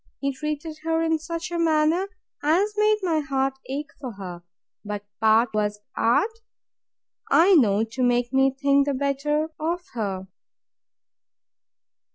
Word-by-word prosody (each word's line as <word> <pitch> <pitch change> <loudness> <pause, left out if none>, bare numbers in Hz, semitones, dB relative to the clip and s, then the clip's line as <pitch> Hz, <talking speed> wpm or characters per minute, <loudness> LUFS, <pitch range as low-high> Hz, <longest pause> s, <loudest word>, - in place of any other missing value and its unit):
he 275 0 -1
treated 305 +2 -5
her 325 +1 0
in 320 -1 +1
such 335 +2 -5
a 340 - -2
manner 325 +3 +2 0.3
as 365 +8 +2
made 425 0 +3
my 330 -4 +1
heart 270 -2 -1
ache 285 +2 -4
for 255 -4 -6
her: 180 -3 -8 0.4
But 205 -1 -5
part 220 +1 +4
was 210 -1 -1 0.2
art, 435 - +1 0.9
I 360 +5 +6
know, 220 - +4
to 225 +3 -5
make 245 0 +1
me 265 0 +4
think 280 +1 +2
the 280 - 0
better 285 +3 0
of 340 +3 -2
her. 195 -5 -3
280 Hz, 140 wpm, -24 LUFS, 240-325 Hz, 0.9 s, I